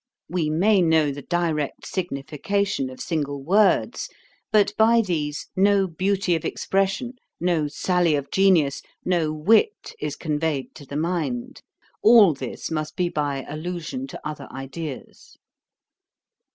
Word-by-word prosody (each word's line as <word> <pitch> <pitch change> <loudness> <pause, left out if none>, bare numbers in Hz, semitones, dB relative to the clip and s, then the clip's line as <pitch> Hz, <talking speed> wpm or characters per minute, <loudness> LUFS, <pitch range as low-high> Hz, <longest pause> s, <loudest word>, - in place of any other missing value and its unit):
We 170 -4 -1
may 190 +6 +3
know 160 -3 +3
the 140 +1 -7
direct 165 -3 -2
signification 170 0 -2
of 130 - -11
single 145 -4 -3
words; 200 - +2 0.4
but 205 -1 +4
by 230 +2 +5
these 155 -7 -3
no 195 0 +4
beauty 185 +1 0
of 160 - -3
expression, 195 +6 -1 0.3
no 170 -3 +1
sally 175 +1 +1
of 140 -1 -4
genius, 175 -8 +3 0.2
no 170 -4 +1
wit 220 - +2
is 150 -1 -3
conveyed 150 -3 -2
to 145 - -13
the 145 - -4
mind. 155 -7 -2 0.4
All 215 -6 +7
this 135 +1 -6
must 155 -1 -3
be 180 -1 0
by 145 -4 -2
allusion 175 - -5
to - - -7
other 150 -3 -7
ideas. 135 +2 -8
165 Hz, 130 wpm, -24 LUFS, 150-195 Hz, 0.4 s, All